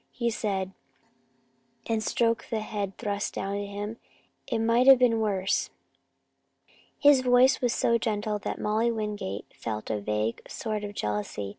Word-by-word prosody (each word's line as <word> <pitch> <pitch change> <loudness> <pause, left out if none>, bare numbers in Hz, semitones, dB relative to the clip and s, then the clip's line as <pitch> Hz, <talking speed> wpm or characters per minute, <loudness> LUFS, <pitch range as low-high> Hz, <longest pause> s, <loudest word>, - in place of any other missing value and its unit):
he 235 -1 -1
said, 195 -4 -2 1.1
and 225 -1 0
stroked 230 0 0
the 220 -1 -1
head 200 -3 -4
thrust 205 0 -3
down 195 +1 -3
to 200 0 -3
him. 205 +2 -5 0.5
"It 235 - -1
might 230 +3 +3
have 270 -1 +10
been 240 -2 +3
worse." 200 -3 0 1.3
His 285 -3 +6
voice 250 +1 +4
was 245 -2 +2
so 235 0 +2
gentle 210 -1 -1
that - - -4
Molly 220 +3 +1
Wingate 210 - -4
felt 110 -1 -5
a 105 -1 -2
vague 105 +2 -1
sort 215 -3 -3
of 205 0 -6
jealousy. 105 - -3
210 Hz, 150 wpm, -27 LUFS, 195-230 Hz, 1.3 s, have